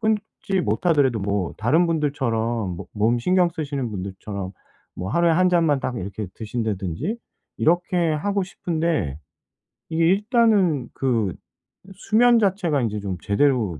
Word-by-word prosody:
끊지 215 -3 -1
못하더라도 145 -9 +2
뭐 100 -3 -2
다른 150 +11 +3
분들처럼 120 - -1
뭐 - - -8
몸 110 +3 +2
신경 180 +7 +3
쓰시는 140 -6 -3
분들처럼 95 0 -6 0.4
뭐 90 +1 -5
하루에 170 +5 +3
1 185 +3 +4
잔만 165 -6 +2
딱 125 - -3
이렇게 100 +1 -5
드신다든지 110 - -3 0.4
이렇게 175 0 +2
하고 200 +6 0
싶은데 160 - -2 0.7
이게 165 +1 +2
일단은 200 - +3
그 115 -8 0 0.6
수면 235 +5 +4
자체가 185 -8 +1
인제 105 -3 -1
좀 100 -3 -4
제대로 105 - +1
145 Hz, 285 characters per minute, -23 LUFS, 105-175 Hz, 0.7 s, 1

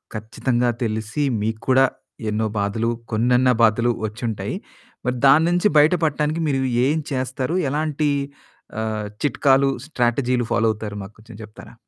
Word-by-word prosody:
ఖచ్చితంగా 120 +3 -1
తెలిసి 110 +5 -2 0.2
మీకు 110 +1 -2
కూడా 130 +1 +6 0.5
ఎన్నో 110 +1 0
బాధలు, 105 +3 -1 0.2
కొన్నన్న 125 +3 +3
బాధలు 115 +2 +3
వచ్చుంటాయి. 110 0 -4 0.5
మరి 125 0 -1
దాని 155 +4 +6
నుంచి 175 +3 +3
బయట 150 +4 +5
పడటానికి 150 +2 -1
మీరు 135 -2 0 0.3
ఏం 150 +3 +1 0.2
చేస్తారు 130 +5 -2
ఎలాంటి 150 +1 0 0.7
ఆహ్, 110 -1 -3 0.2
చిట్కాలు, 135 0 +3 0.2
స్ట్రాటజీలు 125 -3 0
ఫాలో 110 +2 +2
అవుతారు 105 -1 -7
మాకు 95 +2 -12
కొంచెం 110 -1 -13
చెప్తారా? 105 0 -13
120 Hz, 130 wpm, -22 LUFS, 110-140 Hz, 0.7 s, కూడా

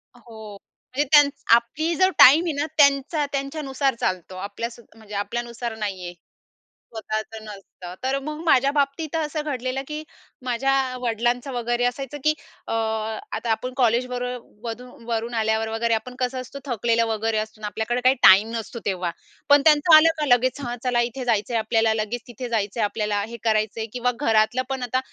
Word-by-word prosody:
हो, 220 -3 -11 0.4
म्हणजे 285 - +2
त्यानं 290 -2 +7 0.3
आपली 310 +8 -1
जर 375 +3 +4
टाईम 305 +7 +8
आहे 330 - -1
ना, 290 +1 -1
त्यांचा 285 +1 +3
त्यांच्यानुसार 275 -1 -2
चालतो. 185 -1 -2
आपल्या 205 +4 -4
स 240 - -14 0.2
म्हणजे 215 -2 -11
आपल्यानुसार 235 +2 -4
नाही 195 -4 -4
आहे. 175 - -6 0.8
स्वतःचं 220 0 -5
नसतं. 195 -3 -10
तर 265 +1 0
मग 300 +2 -6
माझ्या 275 -3 +4
बाबतीत 285 +3 -1
असं 310 -1 -1
घडलेलं, 260 -2 -3
की 300 0 -5 0.4
माझ्या 255 +2 0 0.3
वडिलांचं 240 +3 -1
वगैरे 240 0 -1
असायचं, 270 +3 -3
की 305 - +4 0.3
अ, - - -3
आता 220 - -2
आपण 250 +3 -2
कॉलेजबरोबर 250 -1 -1
वधू 240 +2 -6 0.2
वरून 230 0 -2
आल्यावर 220 0 0
वगैरे 230 +1 0
आपण 235 +3 -3
कसं 255 0 -1
असतो, 255 +2 -9
थकलेलं 230 -2 +1
वगैरे 220 0 -1
असतो 215 0 -4
ना, 210 - -3
आपल्याकडे 220 +4 -2
काही 255 +1 +5
टाईम 200 +4 +8
नसतो. 230 +1 -5
तेव्हा 180 -3 -1 0.4
पण 285 0 +7
त्यांचं 310 +1 +6
आलं 310 +1 +7
का 300 - 0
लगेच, 255 +1 +2
"हा 240 -2 -4
चला, 245 -2 +2
इथे 245 +2 -3
जायचं 225 -1 0
आहे 230 - +2
आपल्याला. 225 0 +2
लगेच 235 +3 -5
तिथे 245 +1 -7
जायचं 215 -1 -2
आहे 215 - +3
आपल्याला. 210 -1 -1
हे 235 +1 -8
करायचं 215 -1 0
आहे." 225 - -3
किंवा 250 0 0
घरातलं 225 -1 +2
पण 265 -1 -3
आता 250 +1 0
240 Hz, 175 wpm, -23 LUFS, 220-270 Hz, 0.8 s, टाईम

